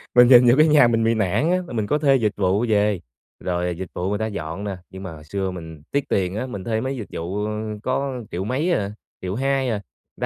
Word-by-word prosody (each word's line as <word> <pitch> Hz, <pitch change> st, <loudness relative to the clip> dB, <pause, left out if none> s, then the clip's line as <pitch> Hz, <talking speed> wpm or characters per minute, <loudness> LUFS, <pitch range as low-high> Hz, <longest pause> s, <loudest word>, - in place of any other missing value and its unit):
mình 125 Hz, 0 st, +8 dB
nhìn 125 Hz, -1 st, +8 dB
vô -, -, +7 dB
cái 155 Hz, +1 st, +6 dB
nhà 150 Hz, -5 st, +6 dB
mình 115 Hz, -1 st, +2 dB
bị 115 Hz, +1 st, +3 dB
nản 110 Hz, -, +1 dB
á, 180 Hz, -, +3 dB
mà -, -, -8 dB
mình 110 Hz, -3 st, -1 dB
có 150 Hz, -, +2 dB
thuê 140 Hz, -2 st, +4 dB
dịch 110 Hz, -5 st, +2 dB
vụ 100 Hz, +3 st, +2 dB
về, 105 Hz, -2 st, +2 dB, 0.4 s
rồi 90 Hz, -1 st, -1 dB
dịch 95 Hz, -1 st, -6 dB
vụ 90 Hz, +2 st, -2 dB
người 105 Hz, 0 st, -1 dB
ta 110 Hz, -, 0 dB
dọn 85 Hz, -2 st, -5 dB
nè, 100 Hz, -2 st, -4 dB
nhưng 95 Hz, 0 st, -9 dB
mà 95 Hz, -, -6 dB
hồi 75 Hz, -1 st, -11 dB
xưa 95 Hz, +4 st, -3 dB
mình 80 Hz, -4 st, -9 dB
tiếc 140 Hz, 0 st, +1 dB
tiền 95 Hz, -1 st, 0 dB
á, 110 Hz, -, -2 dB
mình 100 Hz, -7 st, -6 dB
thuê 110 Hz, +2 st, -1 dB
mấy 130 Hz, +2 st, -2 dB
dịch 110 Hz, -, -6 dB
vụ, 95 Hz, +5 st, -3 dB
ơ, 105 Hz, -, -2 dB, 0.3 s
có 130 Hz, -1 st, -2 dB
triệu 90 Hz, +2 st, -3 dB
mấy 135 Hz, -, 0 dB
à, 100 Hz, -11 st, 0 dB, 0.3 s
1.200.000 130 Hz, +7 st, 0 dB
à, 115 Hz, -, 0 dB, 0.4 s
người -, -, -19 dB
105 Hz, 255 wpm, -22 LUFS, 95-125 Hz, 0.4 s, mình